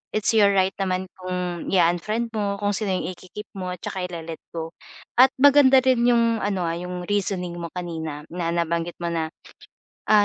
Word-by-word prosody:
it's 215 +1 +1
your 210 -2 +6
right 190 0 +3
naman 185 0 0
kung 180 -2 -3
i-a-unfriend 195 +6 +1
mo 205 -2 -1
kung 205 0 0
sino 205 0 -2
yung 185 - -2
iki-keep 185 +4 -10
mo 185 -1 -3
at 180 - -21
'tsaka 185 -1 -3
ile-let 165 -2 -7 0.2
go 165 0 -4 0.5
at 260 +1 +9
maganda 275 -1 +7
rin 260 -2 +3
yung 230 -1 +3
ano, 195 -3 -1
ah, 165 - -1
yung 180 0 -5
reasoning 190 -3 -1
mo 170 - -4
kanina 160 -4 -5
na 175 -2 -2
nabanggit 170 0 -1
mo 170 - -1
na, 160 -1 -1 0.8
ah, 210 -1 +6
185 Hz, 180 wpm, -24 LUFS, 170-210 Hz, 0.8 s, at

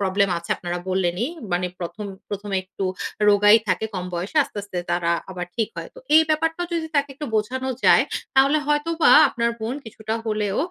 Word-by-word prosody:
Problem 200 0 +2
আছে 170 - -12
আপনারা 175 0 -4
বললেনই। 185 - 0 0.2
মানে 180 +1 +1
১ম, 205 +5 -5 0.2
১ম 205 0 -5
এ - - +3
একটু 190 +1 -6 0.4
রোগাই 205 +1 +7
থাকে 185 +4 +1
কম 180 -1 -3
বয়সে 180 - -4
আস্তে, 210 - -8
আস্তে 190 -3 -6
তারা 170 -1 +1 0.2
আবার 180 -1 -5
ঠিক 225 -2 0
হয়। - - -6
তো - - -12 0.2
এই 320 - +8
ব্যাপারটাও 325 +3 0
যদি 325 -1 -1
তাকে 285 0 +2
একটু 295 +2 -6
বোঝানো 260 +5 -2 0.2
যায় - - +6 0.3
তাহলে 275 +3 +5
হয়তোবা 320 +3 +2 0.2
আপনার 235 -2 0
বোন 230 +4 -3
কিছুটা 220 0 -5
হলেও 210 -2 -1
210 Hz, 185 wpm, -23 LUFS, 185-270 Hz, 0.4 s, এই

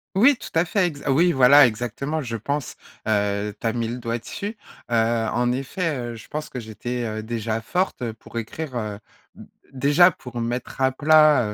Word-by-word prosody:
Oui, 250 +6 +5
tout - - -9
à 165 +1 +3
fait, 185 +2 +1
exa 145 -5 -2
oui 170 +6 +4
voilà 135 +1 +7
exactement 125 +7 -2
je 115 -3 -4
pense, 140 +5 -3 0.3
heu, 105 -1 0
tu - - -9
as 110 - 0
mis 115 -2 -1
le 120 +2 -4
doigt 115 -1 -3
dessus. 205 - -6 0.3
Heu, - - -1 0.4
en 120 0 +1
effet, 145 +5 -2 0.2
heu, - - -8
je 110 - -12
pense 150 0 -5
que 125 - -6
j'étais, 120 +2 -5
heu, 110 0 -4
déjà 115 0 -3
forte, 180 +1 -1
heu, 115 - -3
pour 115 +1 -11
écrire, 130 +5 -5
heu, 105 -3 -4 0.4
d - - -13 0.2
déjà 145 +7 +5
pour 125 -6 -8
mettre 120 +3 -4
à 130 0 +4
plat, 150 -5 +4
125 Hz, 200 wpm, -23 LUFS, 115-150 Hz, 0.4 s, voilà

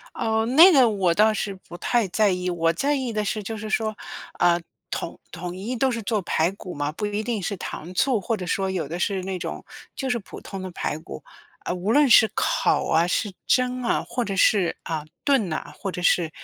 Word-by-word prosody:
哦， 220 0 0
那 305 +11 +8
个 265 -6 +6
我 190 -5 +1
倒 215 +3 +4
是 205 -2 -3
不 185 -2 -12
太 235 0 +1
在 210 +2 +2
意， 180 0 -1
我 165 -1 +1
在 280 - 0
意 260 -4 -2
的 215 -1 -1
是 210 +1 -2
就 220 +2 -5
是 215 0 -6
说 215 -1 0 0.4
啊， 175 0 +3 0.3
统 165 - -4
统 175 +1 -6
一 220 +7 -4
都 260 +2 +1
是 230 -2 -3
做 210 +1 0
排 165 0 +1
骨 185 -2 -9
嘛， 145 +1 -2
不 210 +6 -3
一 205 +1 -2
定 220 -3 -2
是 200 +2 -2
糖 175 0 -7
醋， 250 +2 +2
或 220 +4 -1
者 185 - -6
说 190 +1 0
有 180 -6 -2
的 170 +4 -5
是 190 +1 -1
那 190 0 -4
种 - - -6 0.3
就 265 -2 -3
是 245 - +1
普 195 - -11
通 195 - -7
的 185 0 -6
排 150 - -3
骨， 160 - -9 0.4
啊， - - -3
无 185 +5 -1
论 290 0 +5
是 220 -1 +8
烤 - - +1
啊、 165 +2 +3
是 200 +2 -1
蒸 250 0 +1
啊， 235 - 0
或 245 +1 -2
者 195 -2 -3
是， 190 -2 +3
啊， 155 -2 -4 0.2
炖 270 -9 +2
呐， 155 - -4
或 195 - -3
者 180 - -6
是， 170 -3 +3
200 Hz, 245 characters per minute, -24 LUFS, 180-230 Hz, 0.4 s, 那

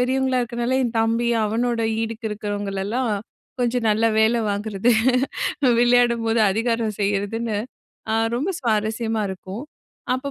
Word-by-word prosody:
பெரியவங்களா 260 0 +1
இருக்கிறதுனால, 240 +2 -1
என் 235 -1 -2
தம்பி 230 +1 +1 0.2
அவனோட 230 +2 0 0.2
ஈடுக்கு 225 0 -4
இருக்கிறவங்களெல்லாம் 205 +3 -2 0.5
கொஞ்சம் 240 -1 +1
நல்ல 220 +2 +2
வேல 225 +2 +3
வாங்கிறது, 205 +2 0 0.9
விளையாடும்போது 235 -2 +3
அதிகாரம் 230 +1 0
செய்றதுன்னு, 205 +2 -1 0.6
ஆ - - +2 0.2
ரொம்ப 295 +10 -1
சுவாரஸ்யமா 220 -1 0
இருக்கும். 190 +6 -7 0.5
அப்ப 270 +2 -4
230 Hz, 110 wpm, -22 LUFS, 215-240 Hz, 0.9 s, வேல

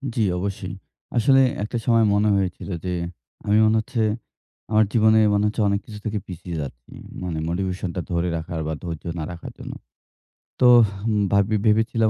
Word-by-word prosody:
জি 115 - +1 0.2
অবশ্যই। 95 -1 -4 0.4
আসলে 135 +4 +5 0.2
একটা 110 +3 -3
সময় 115 -2 +4
মনে 105 +1 +3
হয়েছিল 95 0 -2 0.2
যে 90 - -1 0.5
আমি 105 +1 +3
মনে 110 +1 +3
হচ্ছে 115 +1 -3 0.7
আমার 110 0 +5
জীবনে 110 -1 +5 0.2
মনে 100 0 +2
হচ্ছে 110 +1 -1
অনেক 100 0 +1
কিছু 105 -1 -9
থেকে 105 -1 -1
পিছিয়ে 90 -1 -7
যাচ্ছি - - -9 0.3
মানে 85 -3 -3
মোটিভেশনটা 90 0 -2
ধরে 85 +1 0
রাখার 80 0 -5
বা 80 - -2
ধৈর্য 85 -3 -5 0.2
না - - -3
রাখার 85 - -8
জন্য। - - -7 0.9
তোহ! 120 -2 +7 0.5
ভাব্বি 100 +2 +3
ভেবেছিলাম 110 +1 +3
100 Hz, 160 wpm, -23 LUFS, 90-110 Hz, 0.9 s, তোহ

